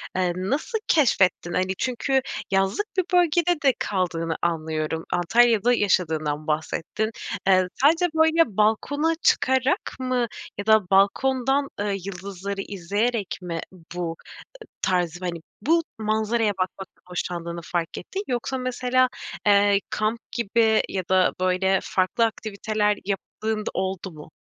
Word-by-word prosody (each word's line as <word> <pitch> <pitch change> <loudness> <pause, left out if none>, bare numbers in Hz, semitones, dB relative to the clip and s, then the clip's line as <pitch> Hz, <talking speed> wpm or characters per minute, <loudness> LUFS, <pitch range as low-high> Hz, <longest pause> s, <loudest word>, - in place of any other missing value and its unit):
eee, 180 -1 +1
nasıl 275 - -1
keşfettin? 190 - +3
Hani, 185 +1 0
çünkü 265 +2 0 0.3
yazlık 195 - +1
bir 370 - +4
bölgede 345 -1 +3
de 270 -2 +5
kaldığını 165 -4 -1
anlıyorum. 160 -1 -2
Antalya'da 230 +5 +4
yaşadığından 160 -8 0
bahsettin. 160 +7 -2 0.4
Eee, 185 -1 +5
sadece 325 +6 +5
böyle 320 - +3
balkona 285 +10 +2
çıkarak 260 +2 +2
mı 255 -2 0 0.3
ya 200 - -4
da 220 -4 +4
balkondan, 265 +8 +3
ııı, 205 0 0
yıldızları 195 +1 -5
izleyerek 205 +3 -2
mi 170 -2 -4 0.4
bu 170 -2 -3 0.7
tarzı, 175 -2 0
hani, 170 -2 -3 0.2
bu 330 +8 +3 0.2
manzaraya 220 +1 +1
bakmaktan 190 0 -5
hoşlandığını 170 -1 -4
fark 170 0 -3
ettin? 385 - -5
Yoksa 255 +2 -2
mesela, 255 0 +1 0.4
eee, 200 0 +5
kamp 215 +2 -1
gibi 225 -1 +2
ya 190 -1 -2
da, 185 -1 +4
böyle, 185 +1 +2
farklı 190 +5 +1
aktiviteler 215 -1 -1
yaptığın 215 +2 -3
da - - -1
oldu 190 0 -3
mu? 155 -1 -12
205 Hz, 125 wpm, -24 LUFS, 180-245 Hz, 0.7 s, de